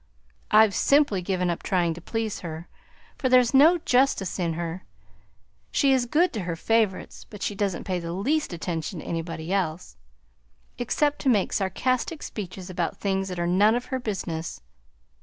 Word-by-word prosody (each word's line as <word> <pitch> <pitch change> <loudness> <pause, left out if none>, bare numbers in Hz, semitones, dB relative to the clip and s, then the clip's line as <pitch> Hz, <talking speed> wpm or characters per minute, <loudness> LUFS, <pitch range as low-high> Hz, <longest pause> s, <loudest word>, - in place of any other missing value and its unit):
"I've 215 -1 +6
simply 280 -6 +3
given 180 -1 0
up 170 - -4
trying 175 -3 +1
to 170 - -10
please 225 +3 -3
her, 165 0 -7 0.5
for 260 - +1
there's 250 -1 +5
no 310 +6 +7
justice 250 - +1
in 170 -2 0
her; 170 +2 -5 0.9
she 275 -1 +3
is 250 -2 +1
good 335 +9 +2
to 220 - -3
her 170 -2 -3
favorites, 220 +1 -1
but 210 -2 -8
she - - -1
doesn't 200 -3 -2
pay 185 -2 -2
the 170 -1 -5
least 270 - 0
attention 170 +1 -4
to - - -12
anybody 165 +1 -4
else, 180 -3 -2 0.8
except 290 +4 0
to 270 - +1
make 210 -6 +2
sarcastic 255 - -1
speeches 190 -3 -7
about 180 -2 -3
things 195 -1 -1
that 180 -1 -5
are 175 - -1
none 200 +6 +4
of 245 +1 -2
her 260 - 0
business. 180 - -4
195 Hz, 170 wpm, -25 LUFS, 175-245 Hz, 0.9 s, no